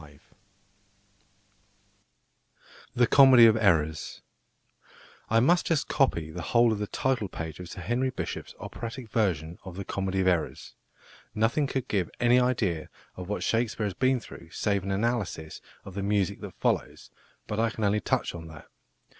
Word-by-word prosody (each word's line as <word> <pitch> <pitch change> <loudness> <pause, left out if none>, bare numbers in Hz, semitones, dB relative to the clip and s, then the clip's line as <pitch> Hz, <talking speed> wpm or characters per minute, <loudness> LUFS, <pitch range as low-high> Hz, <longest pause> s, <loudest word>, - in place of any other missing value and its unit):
THE 120 -1 +4
COMEDY 130 -2 +8
OF 110 -1 +6
ERRORS 80 -8 +1 1.1
I 115 - +4
must 175 +9 +3
just 160 -4 +1
copy 85 - +1
the 90 - -6
whole 120 +6 +3
of 105 - -2
the 105 - -2
title 130 -4 -1
page 80 -3 -7
of 90 -1 -8
+Sir 95 - -8
Henry 125 +6 0
Bishop's+ 130 - -6
operatic 115 0 -7
version 85 -7 -1
of 90 -2 -9
The 100 0 -6
Comedy 95 -1 -2
of 95 - +2
Errors. 90 -3 -1 0.6
Nothing 115 +7 +1
could 130 -1 -3
give 95 -5 0
any 125 +1 +5
idea 110 -10 0 0.3
of 90 0 -8
what 105 - -2
Shakespeare 115 -1 0
has 100 - -2
been 130 +3 +2
through 85 -6 -12
save 100 +3 -1
an 95 - -6
analysis 95 -6 -2 0.2
of 95 - -9
the 100 - -4
music 100 -2 0
that - - -8
follows, - - -2 0.3
but 105 - -3
I 115 0 +2
can 110 -1 -5
only 105 +1 +2
touch - - -1
on 80 -2 -8
that. 80 -3 -12
105 Hz, 160 wpm, -27 LUFS, 90-120 Hz, 1.1 s, COMEDY